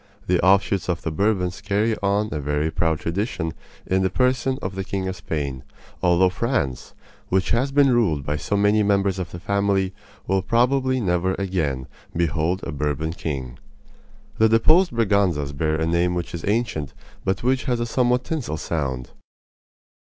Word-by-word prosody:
The 90 Hz, -1 st, +1 dB
offshoots 95 Hz, 0 st, +3 dB
of 85 Hz, -2 st, -1 dB
the 80 Hz, -, -2 dB
Bourbons 95 Hz, 0 st, 0 dB
carry 110 Hz, +3 st, +1 dB
on 100 Hz, +2 st, +1 dB
a 75 Hz, -, -2 dB
very 75 Hz, +2 st, -1 dB
proud 80 Hz, -1 st, 0 dB
tradition 85 Hz, -2 st, -2 dB, 0.3 s
in 95 Hz, +1 st, +1 dB
the 95 Hz, -, +2 dB
person 130 Hz, +4 st, +1 dB
of 95 Hz, -, -4 dB
the 95 Hz, 0 st, -3 dB
King 95 Hz, -1 st, -3 dB
of 95 Hz, -, -3 dB
Spain, 70 Hz, -7 st, -4 dB, 0.4 s
although 90 Hz, +1 st, +4 dB
France, 90 Hz, -, -2 dB, 0.3 s
which 95 Hz, 0 st, +1 dB
has 130 Hz, +4 st, +1 dB
been 140 Hz, -1 st, +4 dB
ruled 85 Hz, -, +1 dB
by 75 Hz, -, -1 dB
so 100 Hz, +6 st, -1 dB
many 105 Hz, +1 st, +3 dB
members 100 Hz, -2 st, +2 dB
of 90 Hz, -2 st, -4 dB
the 85 Hz, -, -8 dB
family, 100 Hz, 0 st, 0 dB, 0.3 s
will 95 Hz, 0 st, +1 dB
probably 130 Hz, +5 st, +2 dB
never 95 Hz, -3 st, +1 dB
again 80 Hz, -10 st, -1 dB, 0.3 s
behold 85 Hz, +2 st, 0 dB
a -, -, -4 dB
Bourbon 75 Hz, +2 st, -2 dB
king. 65 Hz, -7 st, -5 dB, 0.8 s
The 110 Hz, 0 st, +5 dB
deposed 155 Hz, -, +5 dB
Braganzas 100 Hz, -10 st, +1 dB
bear 75 Hz, +2 st, 0 dB
a 80 Hz, +1 st, 0 dB
name 85 Hz, +2 st, +1 dB
which 85 Hz, -1 st, -4 dB
is 85 Hz, -, -5 dB
ancient, 100 Hz, -, -1 dB, 0.3 s
but 95 Hz, +4 st, -1 dB
which 130 Hz, +1 st, +1 dB
has 125 Hz, -3 st, 0 dB
a 120 Hz, -, 0 dB
somewhat 125 Hz, +1 st, +1 dB
tinsel 135 Hz, -, -3 dB
sound. 70 Hz, -5 st, -3 dB
95 Hz, 165 wpm, -23 LUFS, 80-110 Hz, 0.8 s, The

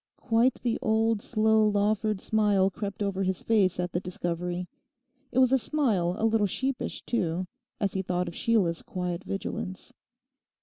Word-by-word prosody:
Quite 235 Hz, +2 st, +2 dB
the 235 Hz, -2 st, 0 dB
old 220 Hz, 0 st, +2 dB
slow 220 Hz, -1 st, +3 dB
Lawford 210 Hz, 0 st, +1 dB
smile 205 Hz, -3 st, +2 dB
crept 205 Hz, +1 st, -4 dB
over 195 Hz, -1 st, -1 dB
his 190 Hz, -1 st, -1 dB
face 195 Hz, -6 st, +2 dB
at 180 Hz, -1 st, -1 dB
the 175 Hz, -, 0 dB
discovery. 175 Hz, 0 st, -3 dB, 0.6 s
It -, -, -4 dB
was 260 Hz, -1 st, +5 dB
a 265 Hz, -, +4 dB
smile 215 Hz, -, +1 dB
a 220 Hz, -, 0 dB
little 220 Hz, -2 st, +3 dB
sheepish 265 Hz, +6 st, -3 dB
too, 180 Hz, -5 st, -1 dB, 0.3 s
as 200 Hz, -2 st, 0 dB
he 190 Hz, -, 0 dB
thought 180 Hz, -1 st, -1 dB
of 170 Hz, -, -5 dB
Sheila's 185 Hz, -6 st, +1 dB
quiet 180 Hz, 0 st, -4 dB
vigilance. 190 Hz, -1 st, -5 dB
200 Hz, 160 wpm, -28 LUFS, 180-225 Hz, 0.6 s, was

